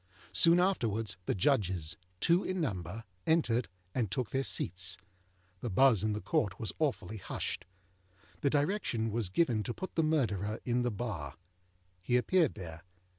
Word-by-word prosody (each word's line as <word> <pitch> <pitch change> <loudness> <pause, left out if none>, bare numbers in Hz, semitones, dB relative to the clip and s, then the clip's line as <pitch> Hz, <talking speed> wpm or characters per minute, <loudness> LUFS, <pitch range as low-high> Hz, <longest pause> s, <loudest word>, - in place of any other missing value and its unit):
Soon 170 +1 +6
afterwards 115 - +1
the - - +1
Judges, 95 - +1 0.2
two 170 - +3
in 185 0 -2
number, 100 - -3 0.2
entered, 125 -8 +3 0.3
and 115 -6 0
took 125 +2 -2
their 135 0 +1
seats. 90 -5 0 0.6
The 120 - -3
buzz 115 -1 +5
in 110 0 +1
the 105 - -3
Court 125 - 0
was 110 - -2
awfully 135 -7 -1
hushed. 95 - -4 0.7
The 140 - +2
direction 145 - 0
was 110 -3 0
given 115 - +2
to 120 +3 -4
put 185 - -6
the 165 - +2
Murderer 110 - 0
to 125 0 +1
the 120 - +1
bar. 100 - -4 0.7
He 120 +7 +2
appeared 165 +5 +3
there. 85 -5 -7
115 Hz, 155 wpm, -32 LUFS, 100-145 Hz, 0.7 s, Soon